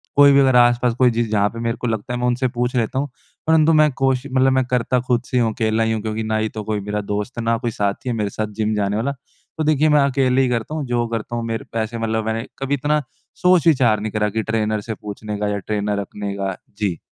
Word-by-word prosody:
कोई 140 0 +7
भी 140 - +5
अगर 130 -2 +4
आस-पास 120 0 +4
कोई, 125 -2 +5
जिस 115 0 0
जहाँ 105 -1 +2
पे 115 - -9
मेरे 115 +1 -2
को 125 - -1
लगता 110 +2 -3
है, 125 - -2
मैं 125 - 0
उनसे 125 +1 +1
पूछ 125 +1 -2
लेता 120 +2 0
हूँ। 145 - -2 0.4
परंतु 160 0 +5
मैं 155 -1 +5
कोशि 135 +1 0
मतलब 130 0 +3
मैं 130 0 +3
करता 125 0 +1
खुद 120 -2 +2
से 125 - 0
ही - - +4
हूँ। 115 - +1
अकेला 110 -1 +1
ही 110 - 0
हूँ। 110 - -1
क्योंकि 110 +1 -3
ना 110 0 -1
ही 110 0 0
तो 110 - -6
कोई 105 0 -2
मेरा 105 +1 -3
दोस्त 105 +4 -4
है, 115 - -2
ना 115 0 +1
कोई 120 0 -3
साथी 100 +4 -2
है 120 - -1
मेरे 105 -2 -1
साथ 110 +2 -3
जिम 110 0 +1
जाने 100 -1 0
वाला। 125 +6 0 0.5
तो 160 - 0
देखिए, 155 0 +3
मैं 150 -1 +5
अकेले 135 -1 +2
ही 130 - +2
करता 120 +5 -2
हूँ 150 -3 -3
जो 120 -1 0
करता 115 +1 -4
हूँ। 115 - -2
मेरे 115 0 -3
वैसे 115 +1 -2
मतलब 110 -1 -1
मैंने 110 0 -2
कभी 135 +1 -2
इतना 150 +2 0 0.4
सोच-विचार 155 - +4
नहीं 110 0 -4
करा 105 -1 0
कि 110 +1 -2
ट्रेनर 110 -1 -1
से 110 +1 -5
पूछने 105 0 -6
का 105 - 0
या 105 0 -1
ट्रेनर 105 0 -2
रखने 100 0 -5
का। 95 -1 -2 0.2
जी। 100 -5 -1
115 Hz, 265 wpm, -20 LUFS, 110-130 Hz, 0.5 s, कोई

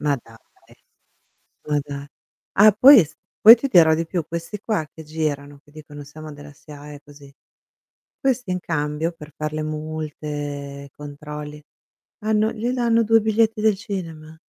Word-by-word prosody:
Ma 145 -1 +1
dai, 115 - -17 1.3
ma 150 -1 +1
da 140 0 -7 0.5
Ah, 210 +2 +7
poi 270 +2 +9
es 160 -5 -1 0.3
poi 225 +2 +11
ti 245 +4 -3
dirò 165 -9 +5
di 165 +1 -2
più, 170 0 -3
questi 170 +5 -6
qua 205 -7 -2
che 160 - -11
girano, 145 -2 -4
che 145 - -23
dicono: 150 -1 -11
"Siamo 155 +2 -11
della 145 0 -12
SIAE" 145 0 -12
così, 145 -1 -16 0.9
questi 255 -7 -1
in 180 - -1
cambio 150 +1 -2
per 155 -3 -13
far 155 0 -4
le 155 - -2
multe, 150 -2 -6
controlli, 150 +1 -9 0.6
hanno 215 0 +1
gli 230 +2 -3
danno 235 -2 +2
2 225 +1 +4
biglietti 220 0 +1
del 215 -2 +2
cinema. 165 -6 -7
155 Hz, 155 wpm, -22 LUFS, 145-210 Hz, 1.3 s, poi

